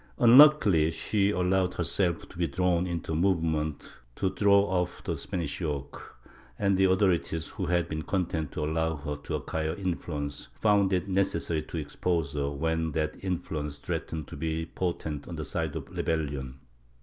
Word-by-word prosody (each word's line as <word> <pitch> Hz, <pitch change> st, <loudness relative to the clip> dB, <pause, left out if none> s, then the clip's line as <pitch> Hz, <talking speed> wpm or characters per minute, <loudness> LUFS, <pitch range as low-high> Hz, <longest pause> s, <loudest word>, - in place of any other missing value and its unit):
Unluckily 120 Hz, -, +7 dB
she 100 Hz, +4 st, +1 dB
allowed 90 Hz, -1 st, +1 dB
herself 85 Hz, -4 st, 0 dB
to -, -, -13 dB
be 85 Hz, -, +2 dB
drawn 90 Hz, 0 st, +1 dB
into 85 Hz, -2 st, -4 dB
a -, -, 0 dB
movement 80 Hz, -4 st, 0 dB, 0.3 s
to 95 Hz, -2 st, 0 dB
throw 100 Hz, -1 st, +5 dB
off 90 Hz, -3 st, -1 dB
the -, -, -2 dB
Spanish 85 Hz, -2 st, -4 dB
yoke, 75 Hz, -5 st, -5 dB, 0.4 s
and 100 Hz, -1 st, +2 dB
the 95 Hz, +1 st, +4 dB
authorities, 90 Hz, -5 st, +1 dB
who -, -, -4 dB
had 90 Hz, -1 st, +1 dB
been 80 Hz, 0 st, -3 dB
content 80 Hz, -4 st, -2 dB
to 75 Hz, -, -3 dB
allow 80 Hz, +1 st, 0 dB
her 75 Hz, 0 st, -4 dB
to 75 Hz, 0 st, -5 dB
acquire 80 Hz, 0 st, -2 dB
influence, 85 Hz, -6 st, -4 dB
found 100 Hz, -3 st, +3 dB
it 90 Hz, 0 st, 0 dB
necessary 95 Hz, -4 st, 0 dB
to 80 Hz, -, -7 dB
expose 80 Hz, 0 st, -1 dB
her, 70 Hz, -1 st, -1 dB
when 80 Hz, +2 st, -1 dB
that 75 Hz, 0 st, -1 dB
influence 80 Hz, -6 st, -3 dB
threatened 75 Hz, +1 st, -4 dB
to -, -, -8 dB
be 80 Hz, +2 st, -2 dB
potent 80 Hz, -4 st, -3 dB
on 85 Hz, -, -6 dB
the 80 Hz, -1 st, -4 dB
side 80 Hz, -2 st, -2 dB
of 75 Hz, -3 st, -5 dB
rebellion. 70 Hz, -5 st, -2 dB
80 Hz, 165 wpm, -28 LUFS, 75-95 Hz, 0.4 s, Unluckily